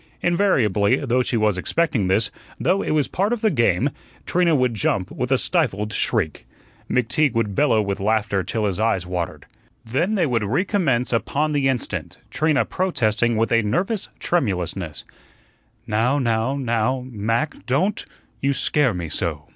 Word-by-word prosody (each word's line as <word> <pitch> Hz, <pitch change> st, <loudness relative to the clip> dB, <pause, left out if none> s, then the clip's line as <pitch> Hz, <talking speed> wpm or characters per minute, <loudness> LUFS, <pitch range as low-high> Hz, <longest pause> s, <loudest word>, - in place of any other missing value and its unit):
Invariably 130 Hz, -, +3 dB
though 125 Hz, 0 st, +2 dB
she 125 Hz, -1 st, -1 dB
was 105 Hz, -4 st, +1 dB
expecting 130 Hz, -, 0 dB
this, 100 Hz, +4 st, +1 dB, 0.3 s
though 185 Hz, +4 st, +2 dB
it -, -, -3 dB
was 150 Hz, -2 st, +2 dB
part 200 Hz, +4 st, -1 dB
of 240 Hz, -, -3 dB
the 220 Hz, -, +3 dB
game 115 Hz, -, +2 dB, 0.3 s
Trina 175 Hz, -2 st, +2 dB
would 125 Hz, -3 st, +2 dB
jump 100 Hz, -2 st, -1 dB
with 125 Hz, +1 st, -3 dB
a 135 Hz, -, +5 dB
stifled 110 Hz, -, 0 dB
shriek. 80 Hz, -6 st, -1 dB, 0.4 s
McTeague 125 Hz, +3 st, +1 dB
would 110 Hz, -3 st, 0 dB
bellow 120 Hz, -4 st, +3 dB
with 100 Hz, -1 st, -3 dB
laughter 105 Hz, -1 st, +1 dB
till 110 Hz, +4 st, -2 dB
his 100 Hz, -1 st, -1 dB
eyes 110 Hz, -5 st, +1 dB
watered. 90 Hz, -2 st, -4 dB, 0.4 s
Then 150 Hz, -, 0 dB
they 180 Hz, -5 st, +2 dB
would 120 Hz, -5 st, 0 dB
recommence 135 Hz, -, 0 dB
upon 145 Hz, +6 st, 0 dB
the 140 Hz, -2 st, +2 dB
instant, 130 Hz, -3 st, -3 dB
Trina 155 Hz, -2 st, +2 dB
protesting 120 Hz, -, 0 dB
with 115 Hz, +2 st, +1 dB
a 115 Hz, 0 st, +4 dB
nervous 185 Hz, -, -1 dB
tremulousness: 90 Hz, -, -2 dB, 0.8 s
"Now 115 Hz, +5 st, +1 dB
now 115 Hz, 0 st, 0 dB
now, 125 Hz, -1 st, 0 dB
Mac, 115 Hz, +5 st, -2 dB
DON'T; 175 Hz, +11 st, +1 dB, 0.4 s
you 140 Hz, +1 st, +2 dB
SCARE 135 Hz, -5 st, +1 dB
me 85 Hz, -2 st, -4 dB
so." -, -, -3 dB
120 Hz, 155 wpm, -22 LUFS, 105-150 Hz, 0.8 s, a